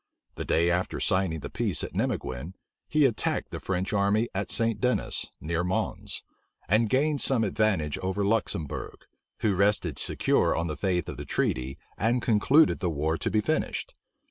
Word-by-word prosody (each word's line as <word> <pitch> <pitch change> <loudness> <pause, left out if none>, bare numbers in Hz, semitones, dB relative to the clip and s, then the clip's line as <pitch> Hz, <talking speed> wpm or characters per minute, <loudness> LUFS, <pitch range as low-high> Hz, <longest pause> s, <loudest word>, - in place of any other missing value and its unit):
The - - -5
day 85 +2 +3
after 90 +1 -1
signing 95 -5 +1
the - - -7
peace - - 0
at - - -5
Nimeguen, 70 +9 -2 0.3
he 150 -1 +4
attacked 115 -5 0
the - - -5
French 95 +1 -2
army 105 +3 +2
at 95 0 -2
St. 115 -2 0
Dennis, 125 0 +1
near 85 +2 -1
Mons; 90 +1 -2 0.4
and 110 +2 +3
gained 145 +3 +2
some 125 -4 +2
advantage 100 -8 +1
over 95 +2 -1
Luxembourg, 100 - -2 0.4
who 105 -3 +2
rested 100 +2 +1
secure - - +2
on 85 - -1
the 75 -2 -3
faith 90 -3 0
of - - -6
the - - -6
treaty, 65 +2 -1 0.2
and 115 +4 +2
concluded 130 +8 +4
the 90 - 0
war 80 +1 0
to - - 0
be 110 - +2
finished. - - -1
100 Hz, 170 wpm, -27 LUFS, 85-110 Hz, 0.4 s, he